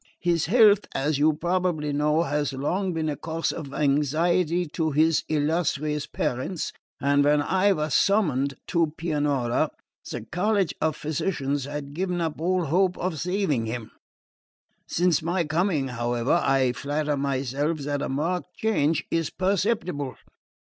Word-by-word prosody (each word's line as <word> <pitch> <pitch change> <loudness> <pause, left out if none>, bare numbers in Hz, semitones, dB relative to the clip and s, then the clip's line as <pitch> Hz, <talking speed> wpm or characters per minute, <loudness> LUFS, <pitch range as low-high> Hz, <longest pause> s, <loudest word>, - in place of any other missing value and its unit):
His 170 -3 +1
health, 210 -1 +5
as 145 +1 0
you 155 +1 +4
probably 170 -2 -1
know, 150 +3 +2
has 145 -2 -1
long 180 +8 -1
been 160 -2 -2
a 150 - -1
cause 160 +4 -2
of 145 -4 -7
anxiety 155 +5 +1
to 160 +1 -1
his 155 +2 +3
illustrious 150 -1 0
parents, 130 +8 -3 0.3
and 140 0 +3
when 145 +1 +4
I 190 +7 +2
was 155 -3 -2
summoned 145 -10 +2
to 165 -3 +1
Pianura 145 -7 0 0.4
the - - -4
College 195 -1 0
of 155 -1 +1
Physicians 145 -3 -2
had 145 0 -6
given 180 +2 -2
up 160 -2 -3
all 180 0 +1
hope 180 +4 +2
of 175 -4 -2
saving 175 - 0
him. 115 -1 -5 1.0
Since 175 -2 +2
my 170 +2 0
coming, 160 -3 0
however, 120 +5 0
I 135 -2 +3
flatter 145 +2 -1
myself 140 +3 -1
that 145 0 -2
a - - -2
marked 175 +6 -2
change 160 -9 +1
is 165 -2 0
perceptible. 185 - -1
155 Hz, 140 wpm, -25 LUFS, 145-175 Hz, 1.0 s, health